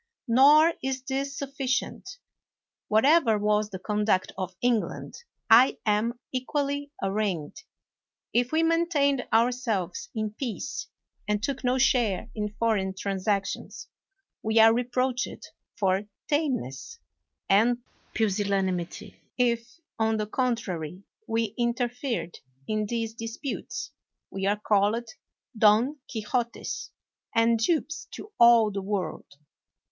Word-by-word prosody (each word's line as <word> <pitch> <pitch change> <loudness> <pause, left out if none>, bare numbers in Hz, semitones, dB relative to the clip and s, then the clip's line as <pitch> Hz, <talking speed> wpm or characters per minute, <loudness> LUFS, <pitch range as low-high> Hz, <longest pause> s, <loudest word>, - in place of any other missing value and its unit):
Nor 295 +7 +6
is 265 -1 -3
this 275 +1 -3
sufficient. 275 +7 -3 0.7
Whatever 230 +1 +4
was 210 0 +1
the 190 - -6
conduct 210 0 0
of 185 -1 -5
England, 240 -3 -1 0.3
I 235 +4 +6
am 220 +3 +1
equally 285 +2 -2
arraigned. 195 - -2 0.7
If 245 +1 +2
we 320 +1 +2
maintained 325 -5 +2
ourselves 225 -6 0
in 215 -1 -2
peace, 235 +1 -5 0.4
and 210 0 0
took 275 +3 -2
no 250 +1 +2
share 240 -4 +2
in 210 -1 -4
foreign 200 -5 0
transactions, 195 +1 -2 0.5
we 220 +1 0
are 225 0 +8
reproached 250 +1 -1 0.3
for 195 -1 +1 0.2
tameness 285 - -2 0.5
and 235 +5 +3 0.3
pusillanimity. 195 -4 -1 0.2
If, 240 +3 0 0.2
on 220 0 +2
the 215 - -1
contrary, 200 - -2 0.2
we 225 -2 -1
interfered 240 - -2 0.3
in 215 -1 -1
these 230 0 -2
disputes, 230 +4 -5 0.4
we 195 0 -2
are 205 +1 +1
called 210 +3 +1 0.5
Don 225 +7 +4
Quixotes, 235 +1 -3 0.5
and 230 0 +4
dupes 315 +6 0
to 425 - -9
all 235 -2 +7
the 195 0 -3
world. 195 -6 -4
230 Hz, 110 wpm, -27 LUFS, 210-255 Hz, 0.7 s, are